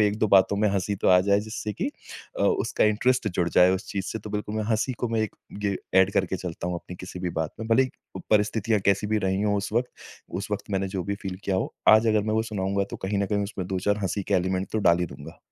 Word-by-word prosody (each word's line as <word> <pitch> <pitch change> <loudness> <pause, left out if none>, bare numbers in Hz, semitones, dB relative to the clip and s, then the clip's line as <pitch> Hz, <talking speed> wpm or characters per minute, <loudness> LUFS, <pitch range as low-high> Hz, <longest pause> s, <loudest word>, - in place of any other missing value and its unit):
1-2 105 +1 +2
बातों 100 0 +5
में 105 +1 +2
हँसी 100 +1 -1
तो - - +1
आ 90 - +7
जाए 100 +2 +3
जिससे 110 0 -5
कि 270 - -2 0.5
अ, - - +2
उसका 420 -4 +2
इंटरेस्ट 110 +3 +2
जुड़ 90 -2 0
जाए 90 +1 +5
उस 95 0 -5
चीज़ 95 -2 -2
से। 110 - -4
तो 105 0 -9
बिल्कुल 105 0 -3
मैं 110 - -1
हँसी 115 +4 +1
को 120 - -1
मैं 115 -1 0
एक 110 - -2 0.3
ये 100 -1 +1 0.2
ऐड 95 +1 +2
करके 95 0 0
चलता 85 -1 -5
हूँ 90 - -2
अपनी 90 +1 -7
किसी 90 0 -8
भी 90 -1 -2
बात 80 -1 -2
में, 110 - -4
भले 115 +3 +5
ही 130 - -3 0.4
परिस्थितियाँ 105 0 +2
कैसी 100 +1 +2
भी 110 +1 +1
रही 95 +1 0
हो 105 -1 +2
उस 100 +1 -3
वक़्त 120 +2 0 0.5
उस 100 - -6
वक़्त 105 0 -4
मैंने 95 -1 0
जो 95 -1 -3
भी 100 - -2
फील 95 -1 -4
किया 95 - 0
हो, - - -2
आज 110 +1 +7
अगर 110 -1 +3
मैं 110 +1 -1
वो 110 - +2
सुनाऊँगा, 100 -2 -1
तो - - -8
कहीं 100 +1 -2
न 100 - +1
कहीं 100 0 0
उसमें 100 -2 -4
2-4 95 +2 0
हँसी 95 +2 -1
के 100 - -1
एलिमेंट 95 +1 0
तो 110 - +1
डाल 85 -4 +4
ही 90 - 0
दूँगा। 75 +3 -11
100 Hz, 265 wpm, -26 LUFS, 95-110 Hz, 0.5 s, आ